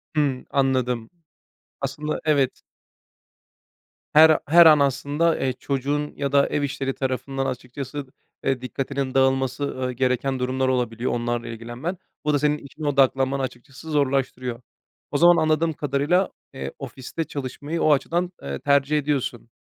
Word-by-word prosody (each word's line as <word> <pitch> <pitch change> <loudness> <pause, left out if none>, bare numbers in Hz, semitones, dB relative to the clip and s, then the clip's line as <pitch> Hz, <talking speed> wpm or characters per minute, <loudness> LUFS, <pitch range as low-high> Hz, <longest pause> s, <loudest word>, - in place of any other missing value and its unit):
Hımm, 140 -4 0
anladım. 125 -4 0 0.7
Aslında, 150 +3 -3
evet. 140 -4 +2 1.5
Her 155 +1 +7
her 170 +3 +8
an 155 -2 +8
aslında, 145 +4 +1
eee, 130 -1 0
çocuğun 140 +3 -2
ya 140 -1 -2
da 140 0 +4
ev 145 - -1
işleri 135 -1 -2
tarafından 135 +1 -2
açıkçası, 135 +3 -5 0.4
eee, 135 -2 0
dikkatinin 135 +1 -3
dağılması, 135 0 +2
ııı, 130 -2 -2
gereken 130 +1 0
durumlar 130 +1 0
olabiliyor, 125 -2 0
onlarla 120 0 -2
ilgilenmen. 120 +10 -5 0.3
Bu 150 - +2
da 145 - +3
senin 150 +1 +2
işine 145 +2 -7
odaklanmanı 135 -1 +2
açıkçası 135 +4 -7
zorlaştırıyor. 130 -4 0 0.5
O 145 - +1
zaman 175 +2 +6
anladığım 155 +1 +2
kadarıyla, 145 +7 +1 0.2
eee, 135 - -5
ofiste 135 +4 -5
çalışmayı 145 +3 -5
o 155 - +5
açıdan, 175 +6 0
eee, 70 0 -4
tercih 140 +1 +2
ediyorsun. 135 -5 -2
135 Hz, 135 wpm, -24 LUFS, 130-150 Hz, 1.5 s, her